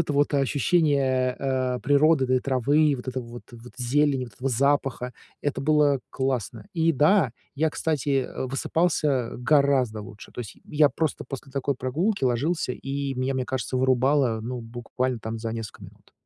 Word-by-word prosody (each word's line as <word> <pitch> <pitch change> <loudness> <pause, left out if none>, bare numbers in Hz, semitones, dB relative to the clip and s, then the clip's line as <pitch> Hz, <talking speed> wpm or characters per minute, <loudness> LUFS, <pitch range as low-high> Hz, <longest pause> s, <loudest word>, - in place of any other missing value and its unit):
это 155 -2 -1
вот 145 +1 +2
ощущение, 135 -2 +2
э, 130 -2 -1
природы, 145 0 +4
да, 130 - +2
этой 130 - +1
травы, 140 +3 +2
вот 125 - -9
этого 130 -1 -3
вот 120 +1 -9
вот 120 +1 -12
зелени, 135 +1 +1
вот 120 - -13
этого 130 +6 -2
запаха. 135 -1 +1 0.3
Это 145 -2 -1
было 145 -1 +3
классно. 125 -5 -2
И, 165 0 +3
да, 150 - +4 0.2
я, 155 +2 +1
кстати, 145 -4 0
э, - - -5
высыпался 140 -2 0
гораздо 130 -4 +2
лучше. 105 +1 -12
То - - -6
есть, 110 - -8
й - - -24
я 150 -1 +4
просто 160 -3 -2
после 135 -1 -7
такой 140 0 -1
прогулки 150 - -1
ложился, 130 +4 0
и 140 +1 -4
меня, 130 +1 -1
мне 130 - -1
кажется, 130 -1 -3
вырубало, 130 -2 +2
ну, 125 +2 -4
буквально, 120 +2 -3
там 110 +1 -5
за 115 0 -4
несколько 115 -4 -7
минут. - - -16
130 Hz, 175 wpm, -25 LUFS, 125-145 Hz, 0.3 s, природы